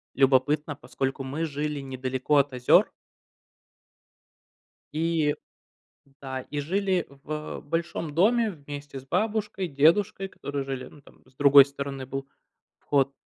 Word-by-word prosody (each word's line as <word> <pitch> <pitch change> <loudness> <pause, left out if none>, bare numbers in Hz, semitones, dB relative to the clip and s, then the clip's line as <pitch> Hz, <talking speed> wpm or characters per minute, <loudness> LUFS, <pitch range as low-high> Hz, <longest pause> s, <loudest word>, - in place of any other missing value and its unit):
любопытно, 140 +3 +3
поскольку 135 0 -3
мы 145 +5 -3
жили 150 -1 -3
недалеко 130 +2 -1
от 140 -1 +2
озер. 125 0 +4 2.0
И 160 -1 +1 0.9
да, 130 -1 -4
и 145 -1 -2
жили 185 +3 0
в 150 +2 -6
большом 165 0 -3
доме 225 +6 +3
вместе 145 -4 -8
с 135 - -13
бабушкой, 210 -1 -1
дедушкой, 170 +7 +3
которые 140 -6 -5
жили, 135 -1 -5
ну, 145 - -15
там, - - -20
с 130 - -25
другой 140 -1 +8
стороны 140 -1 -6
был 135 +1 -5 0.5
вход, 140 -1 +1
145 Hz, 120 wpm, -26 LUFS, 135-165 Hz, 2.0 s, другой